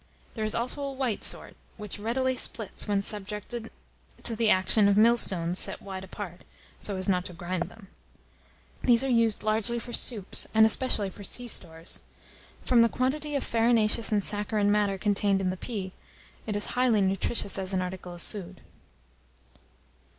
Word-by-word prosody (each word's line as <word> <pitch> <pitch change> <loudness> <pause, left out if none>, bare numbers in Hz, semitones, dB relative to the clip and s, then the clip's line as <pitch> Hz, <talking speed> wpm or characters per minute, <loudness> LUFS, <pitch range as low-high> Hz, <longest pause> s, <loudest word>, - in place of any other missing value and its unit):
There 220 - -4
is 215 - +1
also 250 +5 0
a 280 -1 -3
white 260 -5 -2
sort, - - 0 0.2
which 210 -1 -7
readily 260 +4 0
splits 220 -4 -2
when 200 -1 +1
subjected 210 +3 -6 0.5
to 230 - +4
the 225 0 +2
action 200 +2 +4
of 200 0 +3
millstones 195 -6 +4
set - - +1
wide 190 -1 -7
apart, 190 -2 -8 0.4
so 200 -2 -4
as 185 - 0
not 180 -2 +2
to 180 - -8
grind 175 +1 -3
them. 210 -3 -15 1.0
These 240 0 +4
are 270 - -1
used 230 -3 +2
largely 220 +2 0
for 240 +1 -7
soups, 210 -6 -1
and 220 0 +7
especially 220 -3 +3
for 200 - -11
sea 245 +5 -3
stores. 165 -6 0 0.6
From 245 -2 +4
the 230 - +5
quantity 290 +5 -1
of 280 - 0
farinaceous 230 -1 +3
and 205 -2 +2
saccharine 205 0 0
matter 205 -2 +1
contained 200 0 +1
in 185 -1 0
the - - -4
pea, 190 -1 -5 0.6
it 210 - -2
is 205 - -2
highly 245 -4 +3
nutritious 195 +1 +1
as 190 0 -4
an 185 -1 0
article 180 -1 -7
of 175 - -13
food. 190 -3 -9
210 Hz, 170 wpm, -28 LUFS, 190-230 Hz, 1.0 s, and